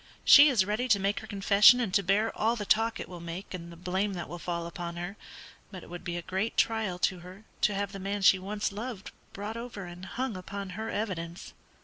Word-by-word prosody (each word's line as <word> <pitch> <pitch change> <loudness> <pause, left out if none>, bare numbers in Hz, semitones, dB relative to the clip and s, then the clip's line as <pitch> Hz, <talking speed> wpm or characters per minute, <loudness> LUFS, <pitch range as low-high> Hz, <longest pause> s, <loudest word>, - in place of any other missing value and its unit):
She 290 +1 +9
is 225 -9 +3
ready 215 +5 -1
to 215 -5 +4
make 200 +1 0
her 220 - -11
confession 205 +4 +6
and 220 -7 -2
to 200 - +4
bear 200 +4 +1
all 225 +2 +1
the 210 -3 -4
talk 225 +2 +2
it - - -5
will 180 -1 -9
make 170 +4 -7
and 170 -2 -7
the - - -10
blame 185 +4 -2
that 175 -2 -5
will 175 - -7
fall 170 -1 -3
upon 170 0 -6
her; 175 +3 -5 0.5
but 185 -3 -9
it - - -14
would 175 - -7
be 175 0 -3
a 175 - -5
great 190 +6 -2
trial 220 -5 +1
to 180 0 0
her 185 +4 -12 0.2
to 210 - +2
have 200 0 -2
the 195 - -7
man 200 +1 -3
she 190 -1 +6
once 205 +3 -3
loved 210 -1 -6 0.2
brought 210 +3 -6
over 230 -5 -7
and 175 +1 -9
hung 255 0 -3
upon 195 +1 -6
her 220 +3 -5
evidence." 175 -5 -4
195 Hz, 240 wpm, -29 LUFS, 180-215 Hz, 0.5 s, She